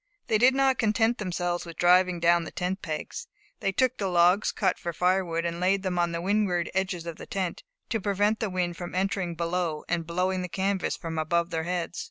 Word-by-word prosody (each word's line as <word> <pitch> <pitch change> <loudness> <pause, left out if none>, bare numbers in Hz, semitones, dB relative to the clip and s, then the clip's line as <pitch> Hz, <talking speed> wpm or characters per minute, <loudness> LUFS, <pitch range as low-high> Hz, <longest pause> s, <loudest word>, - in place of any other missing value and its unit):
They 215 - +2
did 255 +3 +5
not 270 -1 +3
content 225 +2 +2
themselves 175 -3 -2
with 170 -2 -10
driving 180 0 +4
down 170 0 +4
the 160 - -6
tent 185 +2 -3
pins; 190 - -5 0.3
they 195 - 0
took 255 +5 +1
the 200 - 0
logs 180 +2 +4
cut - - 0
for 170 - -4
firewood, 180 -1 +1
and 170 0 -2
laid 190 +2 +2
them 180 -2 -1
on 175 0 +1
the 170 0 -3
windward 190 -2 +1
edges 190 -3 -1
of 170 -2 -6
the - - -10
tent, 185 -3 -3 0.3
to 225 -3 -1
prevent 205 +2 +1
the 220 - -1
wind 180 -2 -2
from 175 0 -6
entering 190 -2 -1
below 170 -2 -2
and 170 -2 -1
blowing 185 +2 0
the 180 - -4
canvas 190 +2 -1
from 160 -2 -4
above 170 +2 0
their 160 -1 -2
heads. 175 -1 -3
180 Hz, 215 wpm, -27 LUFS, 170-195 Hz, 0.3 s, did